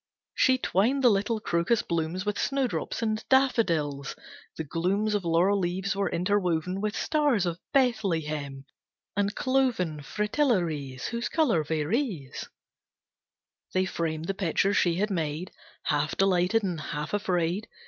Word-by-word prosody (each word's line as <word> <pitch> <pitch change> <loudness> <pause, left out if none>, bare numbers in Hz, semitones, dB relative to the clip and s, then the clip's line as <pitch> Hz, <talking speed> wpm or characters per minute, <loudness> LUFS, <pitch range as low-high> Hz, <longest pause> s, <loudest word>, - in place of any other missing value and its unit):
She 260 0 +4
twined 255 +4 +1
the 245 - +7
little 210 +3 0
crocus 175 +4 +1
blooms 170 +3 -2
With 210 -1 -1
snowdrops 270 -3 -1
and 215 -1 -1
daffodils, 165 - +2 0.4
the 160 - -2
glooms 190 +8 0
Of 205 -2 0
laurel 175 +4 +3
leaves 190 +2 -1
were 200 0 0
interwoven 180 -1 0
With 210 0 -1
Stars 290 - +1
of 170 -1 -2
Bethlehem, 160 - 0 0.5
and 205 +1 0
cloven 240 - +1
Fritillaries, 175 - -1
Whose 235 0 -3
colour 245 - +2
varies. 160 - -2 1.3
They 185 0 +3
framed 165 -3 -2
the 195 - -1
picture 195 +1 +1
she 175 -4 +3
had 205 +4 0
made, 165 0 -2 0.3
Half 150 +1 0
delighted 195 +3 +3
and 175 -5 -2
half 150 +2 -4
afraid. 185 0 0
190 Hz, 130 wpm, -27 LUFS, 165-215 Hz, 1.3 s, the